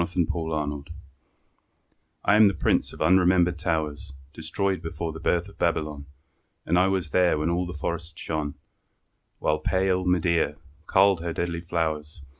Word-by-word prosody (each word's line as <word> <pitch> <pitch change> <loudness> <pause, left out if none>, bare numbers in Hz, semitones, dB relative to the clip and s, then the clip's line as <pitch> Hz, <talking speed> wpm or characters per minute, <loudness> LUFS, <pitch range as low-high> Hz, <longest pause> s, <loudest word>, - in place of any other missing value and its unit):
LE 85 - 0
PRINCE 85 -1 0
ERRANT 75 -3 -3 1.4
I 100 - +5
am 110 0 +7
the 100 - +1
Prince - - +1
of - - -11
unremembered 90 0 +4
towers 75 -4 -2 0.2
Destroyed 95 +3 -2
before 80 0 -4
the 80 - -8
birth 85 +3 0
of 100 - -16
Babylon; 75 -4 -1 0.6
And 85 +2 +3
I 95 - +4
was 95 -5 -1
there 90 -3 +3
when 75 +2 0
all 90 +1 -1
the 90 - -6
forest 85 +1 -5
shone 75 -2 -3 0.8
While 75 0 0
pale 95 +2 +1
Medea 85 -4 +1 0.3
culled 95 -2 +4
her 85 -1 -3
deadly 85 0 -2
flowers. 80 -3 -3
85 Hz, 155 wpm, -26 LUFS, 80-90 Hz, 1.4 s, am